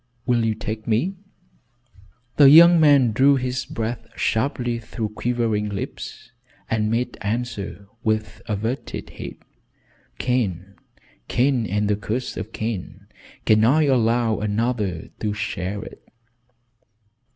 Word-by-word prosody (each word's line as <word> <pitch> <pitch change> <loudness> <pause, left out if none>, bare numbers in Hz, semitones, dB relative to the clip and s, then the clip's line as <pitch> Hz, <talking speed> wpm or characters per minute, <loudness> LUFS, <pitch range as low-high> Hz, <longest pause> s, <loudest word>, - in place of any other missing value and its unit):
Will 120 -2 +2
you 110 -1 +1
take 110 0 -5
me?" 120 - +1 1.2
The 140 -2 +9
young 170 +3 +9
man 140 -6 +5
drew 135 +6 +5
in 130 - -2
his 125 0 -2
breath 115 +1 -4
sharply 120 0 0
through 110 -1 -4
quivering 110 -2 -1
lips, 100 -1 -6 0.4
and 110 -1 +1
made 115 +2 -2
answer 110 -2 -3 0.2
with 110 -1 -1
averted 110 +4 -3
head: - - -8 0.8
"Cain! 100 -7 -1 0.5
Cain 125 -3 +1
and 105 +1 0
the 105 - +2
curse 110 +5 -3
of 110 - -6
Cain! 110 -5 -5 0.4
Can 110 0 +4
I 145 +7 +4
allow 120 -4 +2
another 105 -4 -1
to 105 -1 -2
share 105 -1 -3
it?" - - -11
115 Hz, 120 wpm, -23 LUFS, 105-125 Hz, 1.2 s, The